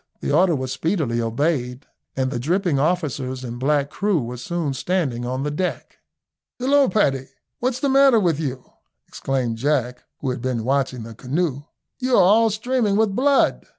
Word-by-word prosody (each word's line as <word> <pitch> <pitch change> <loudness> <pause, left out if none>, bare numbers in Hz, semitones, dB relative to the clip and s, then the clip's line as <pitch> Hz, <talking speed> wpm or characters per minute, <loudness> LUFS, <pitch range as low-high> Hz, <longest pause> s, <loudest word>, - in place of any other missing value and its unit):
The - - -3
order 170 +3 +4
was 130 -2 -3
speedily 155 - -1
obeyed, 125 +2 -1 0.3
and 130 0 0
the 120 - -2
dripping 170 - 0
officers 140 -5 -1
and 120 -1 -6
black 140 +1 +1
crew 200 -4 0
were 125 -1 -5
soon 155 +2 -3
standing 135 -5 -1
on 130 +2 -2
the 150 - -2
deck. 180 +5 -4 0.6
"Hillo, 275 +2 +3
Paddy, 160 -9 +2
why 130 - -14 0.3
what's 255 0 -1
the 280 - 0
matter 270 -3 +5
with 170 -7 +1
you?" 135 -5 -4 0.4
exclaimed 125 -4 -2
Jack, 125 -2 0 0.2
who 135 - -2
had 125 -1 -5
been 125 -3 -2
watching 130 -1 -1
the 115 0 -9
canoe, 140 +4 -2 0.3
"you 255 -1 +1
are 190 - +6
all 220 +5 +5
streaming 220 0 0
with 210 -2 +2
blood." 275 +3 +2
145 Hz, 175 wpm, -22 LUFS, 130-195 Hz, 0.6 s, are